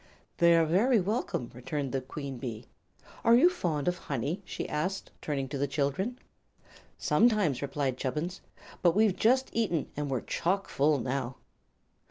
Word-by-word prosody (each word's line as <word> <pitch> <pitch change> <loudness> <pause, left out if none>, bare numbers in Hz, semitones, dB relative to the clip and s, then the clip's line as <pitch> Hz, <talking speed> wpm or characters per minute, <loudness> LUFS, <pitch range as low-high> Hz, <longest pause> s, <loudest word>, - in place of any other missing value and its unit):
"They 170 0 +6
are 165 -1 +4
very 215 +9 +3
welcome," 195 - -2
returned 130 +2 -4
the 135 - -1
Queen 135 0 -6
Bee. 120 -3 -5 0.6
"Are 230 - +6
you 340 +9 +6
fond 165 - -2
of 180 0 0
honey?" 145 - -3
she - - -5
asked, 185 +6 -2
turning 140 -3 -2
to 140 - -4
the 140 - +1
children. 145 - -1 0.8
"Sometimes," 210 - +3
replied 140 -2 -1
Chubbins; 155 +8 -3 0.4
"but 175 -1 +4
we've 210 -3 +4
just 260 +4 +2
eaten, 185 -10 0
and 145 -1 -3
we're 130 -3 -1
chock 195 +3 -1
full 145 +2 +3
now." 130 0 -2
150 Hz, 155 wpm, -29 LUFS, 135-195 Hz, 0.8 s, They